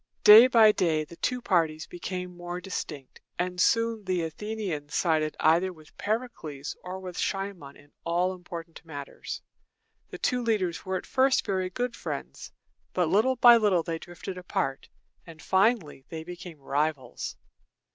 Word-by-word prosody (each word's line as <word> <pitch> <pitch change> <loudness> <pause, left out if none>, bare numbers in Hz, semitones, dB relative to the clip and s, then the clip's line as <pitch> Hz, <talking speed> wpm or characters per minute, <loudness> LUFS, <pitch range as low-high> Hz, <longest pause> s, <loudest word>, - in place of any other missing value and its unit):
Day 220 +4 +11
by 225 -4 +7
day 165 -6 +1
the 170 - -12
two 250 -1 -1
parties 160 -7 +1
became 180 0 -6
more 175 0 -5
distinct, 150 -7 -6 0.2
and 180 0 -1
soon 230 0 +2
the 185 -2 0
Athenians 165 -3 -4
sided 155 -3 +1
either 170 +4 +3
with 155 -3 -17
Pericles 205 - -3
or 185 +1 -6
with 185 -1 -7
Cimon 195 -8 -3
in 145 0 -20
all 175 +2 +1
important 170 -2 -9
matters. 145 -4 -7 0.7
The - - -7
two 250 0 0
leaders 195 -8 -1
were 190 0 0
at - - -8
first 260 0 +2
very 185 -2 -1
good 245 +5 -3
friends, - - -6 0.4
but 180 -3 +1
little 220 +8 +3
by 240 -1 +8
little 200 -6 +2
they 165 0 -3
drifted 175 +2 -8
apart, 135 -6 -3 0.4
and 165 -1 -12
finally 190 - +1
they 160 -1 -6
became 175 -1 -9
rivals. 140 -2 -2
180 Hz, 150 wpm, -28 LUFS, 160-205 Hz, 0.7 s, Day